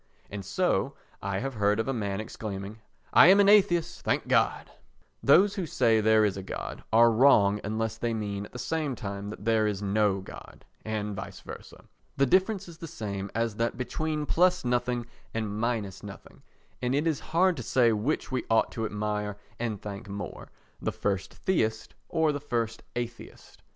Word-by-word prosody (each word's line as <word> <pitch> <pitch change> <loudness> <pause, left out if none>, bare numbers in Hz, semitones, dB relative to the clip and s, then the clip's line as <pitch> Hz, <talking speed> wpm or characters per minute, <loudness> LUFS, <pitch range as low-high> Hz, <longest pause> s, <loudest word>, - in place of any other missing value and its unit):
And 100 -1 -5
so, 95 - 0 0.3
I 100 -1 -2
have 135 +1 -3
heard 105 -1 +1
of 115 - -1
a 135 - 0
man 100 -4 -2
exclaiming 105 -1 -6 0.3
"I - - +9
am 195 +2 +7
an 200 - +6
atheist, 175 -5 +4
thank - - 0
God!" - - +1 0.5
Those 190 +9 +5
who 190 -5 -3
say 115 -5 +3
there 110 0 +5
is 100 -2 0
a - - -4
God 95 - -6
are 115 +1 +6
wrong 110 -4 +5
unless 110 +1 -2
they 120 0 -1
mean 100 -2 -3
at - - -27
the - - -8
same 155 -1 -2
time 100 -3 -5
that 105 -1 -9
there 110 -1 +3
is 105 -1 -2
no 100 -1 +2
God, 95 - -12 0.2
and 105 -2 -3
vice - - -7
versa. - - -11 0.3
The 140 - +4
difference 190 - +2
is 170 -1 -12
the 165 - -6
same 100 -10 -5
as 115 -2 0
that 115 0 -1
between 150 +4 -2
plus 180 0 +2
nothing 125 0 0 0.3
and 105 -2 -2
minus 110 -5 -2
nothing, 100 -2 -11 0.4
and 125 +1 0
it 145 +3 +1
is 160 -4 +1
hard 180 +2 +2
to - - -4
say 120 0 +3
which 120 +8 -1
we 130 - -1
ought 115 0 +3
to 115 - -3
admire 105 -1 -3 0.2
and 115 -4 -2
thank 100 0 -7
most—the 100 0 -7
first 95 -1 -2
theist 110 -12 -1 0.2
or 160 -2 +2
the 145 - -3
first 115 -5 -2
atheist. 120 -1 -7
115 Hz, 180 wpm, -28 LUFS, 105-140 Hz, 0.5 s, I